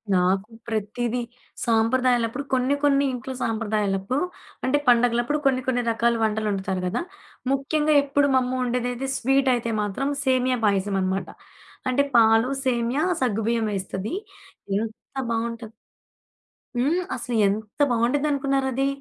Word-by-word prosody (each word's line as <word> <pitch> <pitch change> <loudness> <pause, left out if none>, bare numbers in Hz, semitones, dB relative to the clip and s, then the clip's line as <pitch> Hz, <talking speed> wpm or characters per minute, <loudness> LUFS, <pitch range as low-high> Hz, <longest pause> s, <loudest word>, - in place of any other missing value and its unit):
నాకు 190 +3 +1 0.2
ప్రతీదీ, 235 +2 -2 0.4
సాంప్రదాయాలప్పుడు 240 +2 +2
కొన్ని 260 +2 +2
కొన్ని 280 -1 +4
ఇంట్లో 255 +1 -5
సాంప్రదాయాలప్పుడు, 215 - -1 0.4
అంటే 260 +3 +2
పండుగలప్పుడు 240 +4 +3
కొన్ని 260 -1 +3
కొన్ని 245 -1 +1
రకాల 235 +1 +2
వంటలొండుతారు 205 -3 -1
గదా! 200 +7 -1 0.5
ముఖ్యంగా 300 +3 +1
ఎప్పుడు 285 0 +2
మా - - +6
అమ్మొండేదైతే 250 0 -2
స్వీట్ 270 +1 +2
అయితే 235 -1 -2
మాత్రం 210 +7 -2 0.2
సేమ్య 255 -1 +2
పాయసం 200 -1 +1
అనమాట. 190 +1 -1 0.6
అంటే 265 +2 +3
పాలు, 225 +2 +5 0.2
సేమ్యా, 245 +3 +1 0.2
సగ్గు 225 -4 +1
బియ్యమేస్తది. 210 -3 -2 0.7
ఎంత 220 0 -3 0.4
బావుంటది. 230 -1 -3 1.1
హ్మ్. 295 +9 +2
అసలు 245 -1 -4
ఎంత 210 +4 -4
బావుండిద్డనుకున్నారది? 270 +1 +1
240 Hz, 110 wpm, -24 LUFS, 220-260 Hz, 1.1 s, మా